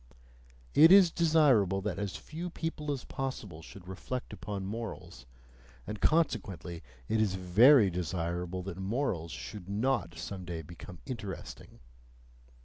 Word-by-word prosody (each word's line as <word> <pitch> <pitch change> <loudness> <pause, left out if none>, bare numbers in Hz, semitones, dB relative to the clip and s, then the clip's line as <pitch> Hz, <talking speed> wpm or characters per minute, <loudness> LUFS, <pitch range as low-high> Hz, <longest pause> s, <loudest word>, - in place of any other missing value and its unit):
It 160 +3 +8
is 190 -3 +8
desirable 145 - +4
that 100 -1 -3
as 100 -2 -3
few 170 +3 -6
people 160 -3 -4
as 135 -3 -3
possible 110 -11 -5
should 90 +3 -13
reflect 125 +7 -5
upon 100 -2 -5
morals, 95 - -7 0.6
and 105 0 -6
consequently 100 - 0 0.3
it 110 - +1
is 100 -3 +1
very 100 +5 +6
desirable 90 +1 -3
that 95 -1 -6
morals 95 - -2
should 100 0 -8
not 100 -6 0
some 95 -2 -6
day 85 -2 -5
become 85 +2 -11
interesting! 100 - -7
100 Hz, 130 wpm, -31 LUFS, 90-130 Hz, 0.6 s, It